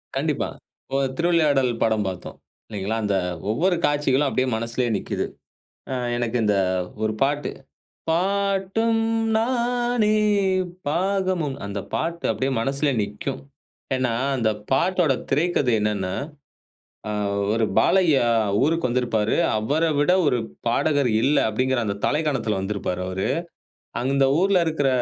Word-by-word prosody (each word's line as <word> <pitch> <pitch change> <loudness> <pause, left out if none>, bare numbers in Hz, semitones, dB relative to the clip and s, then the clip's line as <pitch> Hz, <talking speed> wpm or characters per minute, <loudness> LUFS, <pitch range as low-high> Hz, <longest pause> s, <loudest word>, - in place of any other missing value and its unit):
கண்டிப்பா. - - -1 0.5
ஒரு 135 0 +2
திருவிளையாடல் 150 -7 +3
படம் 110 -2 +1
பார்த்தோம் 95 -2 -6 0.3
இல்லைங்களா, 105 +1 -3
அந்த 100 -1 +1 0.4
ஒவ்வொரு 175 - +2
காட்சிகளும் 145 -1 +2
அப்படியே 130 0 0
மனசுலேயே 115 +2 -1
நிக்கிது. - - -3 0.7
ஆ, - - 0 0.2
எனக்கு 120 0 -1
இந்த 105 -1 +2 0.5
ஒரு 110 0 +1
பாட்டு, 145 +2 0 0.6
பாட்டும் 200 +5 +1 0.3
நானே 240 -2 +1 0.7
பாகமும். 185 -3 0
அந்த 100 0 -4 0.2
பாட்டு 170 +1 -2
அப்படியே 135 +1 -1
மனசில 140 +4 0
நிக்கும். 105 +7 -5 0.5
ஏன்னா 130 -2 0 0.2
அந்த 115 -3 +1 0.2
பாட்டோட 170 +1 +2 0.2
திரைக்கதை 145 -3 +2
என்னென்னா 100 -3 -1 1.0
அ - - -1 0.4
ஒரு 115 0 +2
பாலையா 165 -10 +4 0.4
ஊருக்கு 165 -1 +1
வந்திருப்பாரு. 120 -3 0 0.2
அவரை 145 +10 +1
விட 145 +5 +3
ஒரு 125 -4 +2 0.3
பாடகர் 140 +1 +2
இல்ல 145 +4 +3
அப்படிங்கிற 130 +3 0
அந்த 100 -1 -2
தலைக்கணத்தில 135 -9 0
வந்திருப்பாரு 95 -2 -3
அவரு. 95 +1 -2 0.7
அந்த 135 +2 +2 0.2
ஊர்ல 195 -1 +3
இருக்கிற, 155 -4 +1
135 Hz, 115 wpm, -23 LUFS, 115-170 Hz, 1.0 s, பாலையா